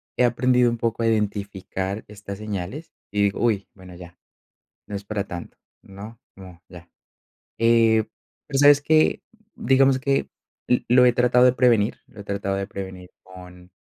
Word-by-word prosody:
he 125 - +2
aprendido 125 0 +2
un 120 - -4
poco 115 0 -2
a - - +2
identificar 100 -2 -3
estas 100 -1 -9
señales 105 - -6 0.2
y 100 0 0
digo, 100 -1 -1
uy, 105 -4 0
bueno, 95 -2 -14
ya, 85 0 -13 0.7
no 105 - -6
es 100 - -6
para 105 -1 -3
tanto, 85 -2 -9 0.2
¿no?, 105 +4 -12 0.2
como 90 -3 -14
ya, 85 -1 -14 0.7
eh, 115 -1 +3 0.4
pero, 135 -2 -2
¿sabes 145 0 +6
qué? 155 +1 +2 0.3
Digamos 135 +1 +3
que 135 +1 0 0.6
lo 125 +1 +5
he 125 - +4
tratado 125 +1 +3
de 125 - +5
prevenir 120 -5 +2
lo 105 - -14
he - - -10
tratado 100 -1 -3
de 100 - -3
prevenir 95 -2 -9
con 90 -1 -14
105 Hz, 160 wpm, -23 LUFS, 95-125 Hz, 0.7 s, sabes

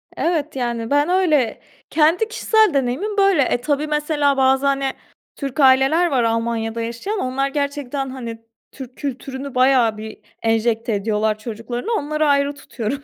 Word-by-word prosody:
Evet, 315 -3 -1
yani, 235 -3 -2
ben 290 +3 +2
öyle 310 -11 +2 0.3
kendi 325 +7 +3
kişisel 440 -2 +2
deneyimim 275 - -1
böyle. 390 -6 +4
E, 245 -2 +1
tabii, 290 +2 -1
mesela, 295 -2 +1
bazı, 265 +1 +3
hani, 275 -1 +1 0.4
Türk 275 0 -5
aileler 270 +6 +5
var 260 -6 +1
Almanya'da 230 0 -1
yaşayan, 235 - -4
onlar 265 +2 -1
gerçekten, 280 -1 -3
hani, 235 -3 -7 0.3
Türk 260 -2 -10
kültürünü 270 -1 -6
bayağı 250 -4 +3
bir 215 0 -8 0.3
enjekte 225 0 +1
ediyorlar 210 +1 0
çocuklarına, 235 - -5
onları 305 +1 -1
ayrı 280 0 +2
tutuyorum, 270 0 -5
270 Hz, 145 wpm, -20 LUFS, 235-295 Hz, 0.4 s, aileler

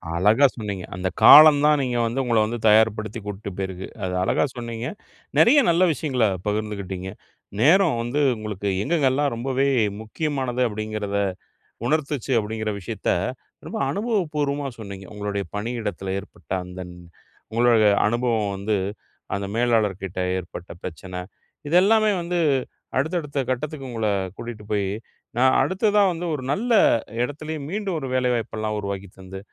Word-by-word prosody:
அழகா 105 +11 +4
சொன்னீங்க. 100 -5 -5
அந்த 90 0 -2
காலம் 150 -1 +10
தான் 150 -1 +4
நீங்க 125 -1 -1
வந்து 115 +3 -2
உங்களை 120 -2 +2
வந்து 120 +2 -3
தயார்படுத்தி 110 0 +3
கூட்டிட்டு 105 0 -6
போயிருக்கு. 95 -1 -4 0.2
அது 90 -1 -2
அழகாக 145 - +2
சொன்னீங்க. 120 0 -4 0.5
நிறைய 285 +5 +7
நல்ல 170 +2 +4
விஷயங்களை 130 -5 0 0.2
பகிர்ந்துகிட்டிங்க. 100 -3 -3 0.5
நேரம் 165 0 +5
வந்து 120 +5 -2 0.2
உங்களுக்கு 105 -2 -5 0.2
எங்கெங்கெல்லாம் 145 -2 +1
ரொம்பவே 135 +3 0 0.3
முக்கியமானது? 130 +1 -2
அப்படிங்கிறதை 105 -2 -2 0.6
உணர்த்திச்சு 140 -2 -1
அப்படிங்கிற 110 0 -3
விஷயத்தை 90 - -2 0.5
ரொம்ப - - -5
அனுபவப்பூர்வமா 150 - -1
சொன்னீங்க. 100 -3 -8
உங்களுடைய 100 -1 -3
பணியிடத்தில 105 -4 -3
ஏற்பட்ட 100 - -16
அந்த 90 +1 -8 0.7
உங்களோட 115 -1 +4 0.2
அனுபவம் 115 -3 0
வந்து 100 +2 -1 0.6
அந்த 100 0 -3
மேலாளர் 115 -5 +1
கிட்ட 95 -1 -5 0.2
ஏற்பட்ட 90 0 -8
பிரச்சனை, 90 +1 -7 0.5
இதெல்லமே 210 +6 +4
வந்து 175 +1 -2 0.6
அடுத்த 160 +7 0
அடுத்த 145 -1 -4
கட்டத்துக்கு 135 +1 -3
உங்கள 115 -2 -1 0.3
கூட்டிகிட்டு 115 -3 -8
போய் 100 -2 0 0.5
நான் 130 +1 +4
அடுத்ததா 205 - +2
வந்து 175 +1 -4
ஒரு 130 - -6
நல்ல 235 +11 -1 0.5
இடத்துலேயே 155 +3 -4
மீண்டும் 195 -2 -2
ஒரு 135 - -5
வேலைவாய்ப்புலாம் 115 -4 -1
உருவாக்கித் 100 -2 -6
தந்து, 95 0 -9
115 Hz, 130 wpm, -23 LUFS, 105-145 Hz, 0.7 s, காலம்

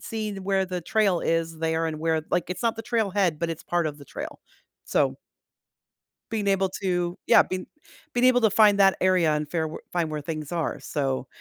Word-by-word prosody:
see 215 -2 -4
where 195 0 0
the 180 -1 -4
trail 195 -1 +1
is 165 -1 -1
there 160 0 0
and 155 -1 -4
where 160 0 0
like, 175 - 0
it's 180 - -4
not 230 -1 +1
the 225 - -5
trail 225 -4 0
head, 180 -6 +1
but 170 -1 -1
it's 165 - -6
part 175 -2 0
of 150 -1 -5
the 140 - -12
trail. - - -7 0.5
So - - +1 1.2
being 210 -2 0
able 195 -1 +2
to, 180 -2 -2
yeah, - - +7
being 185 0 -5 0.5
being 245 +1 +2
able 245 -1 +5
to 220 - +5
find 210 -1 +5
that 195 -1 +6
area 185 -4 +3
and 150 0 -2
fair 160 -2 -1
were 155 - -8
find 170 -3 0
where 150 -1 -4
things 155 -1 -5
are, 170 -2 -2
so, 135 -3 -2
175 Hz, 210 wpm, -25 LUFS, 160-200 Hz, 1.2 s, yeah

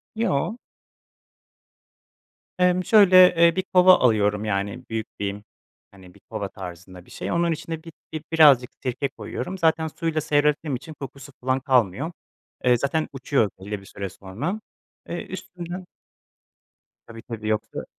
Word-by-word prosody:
Yo. 215 -2 0 2.0
Emm 180 0 +3
şöyle, 185 -4 +7
ııı, 170 - +4
bir 190 - 0
kova 185 0 +8
alıyorum, 105 -3 +2
yani 100 -1 -2
büyük 110 -1 -3
bir, 100 0 -3 0.5
hani 95 -2 -16
bir - - -20
kova 105 -3 -4
tarzında 90 -1 -10
bir - - -19
şey. - - -5
Onun 170 0 +1
içine 160 0 -5
bi 165 - -10 0.2
bir 155 -1 -4
birazcık 145 -6 +6
sirke 135 +2 -2
koyuyorum. 130 +6 -6
Zaten 160 -2 +2
suyla 160 0 -2
seyrettiğim 150 -1 +1
için 155 +6 -8
kokusu 140 -1 -10
falan 130 +1 +1
kalmıyor. 130 - +1 0.5
Eee, 125 -1 +4
zaten 140 +5 -1
uçuyor 135 -4 +1
belli 100 +2 -5
bir - - -16
süre 100 0 -6
sonra. 130 - -5 0.5
Eee, 170 - -4
üstünden 180 -1 -7 1.2
Tabii, 115 -1 -10
tabii 110 -3 -6
yoksa 110 0 -2
135 Hz, 140 wpm, -24 LUFS, 105-165 Hz, 2.0 s, kova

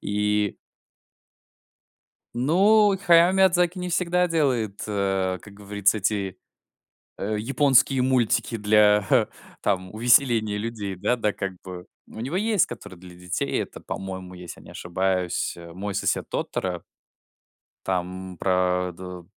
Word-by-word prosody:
И 105 0 0 1.8
Ну, 195 - +4
Хаяо 170 0 +6
Миядзаки 180 -1 +3
не 180 - -3
всегда 180 0 +1
делает, 125 -11 0
э, 95 -3 -1
как 100 - -14
говорится, 100 +1 0
эти, 100 -2 -2 0.8
э, 105 +2 -2
японские 135 +2 +3
мультики 125 -2 +1
для, 105 -1 +4
а, - - +4 0.3
там 95 -1 -1
увеселения 115 -2 +3
людей, 105 -3 -4
да 105 +7 0
да, 105 -3 0
как 95 -1 -4
бы. 90 -1 -8 0.2
У - - -10
него 135 +9 -3
есть 210 -1 +2
который 95 - -10
для 90 0 -13
детей. 90 0 -2
Это, - - -10
по-моему, 95 -1 -6
если 90 -1 -10
я - - -17
не - - -13
ошибаюсь, 90 0 -1
э, 85 -1 -11
"Мой 100 +3 -5
сосед 100 - -1
Тоторо". 90 -2 -3 1.0
Там 95 0 -3
про 90 -1 +1
д 90 0 -9
105 Hz, 130 wpm, -24 LUFS, 95-130 Hz, 1.8 s, Хаяо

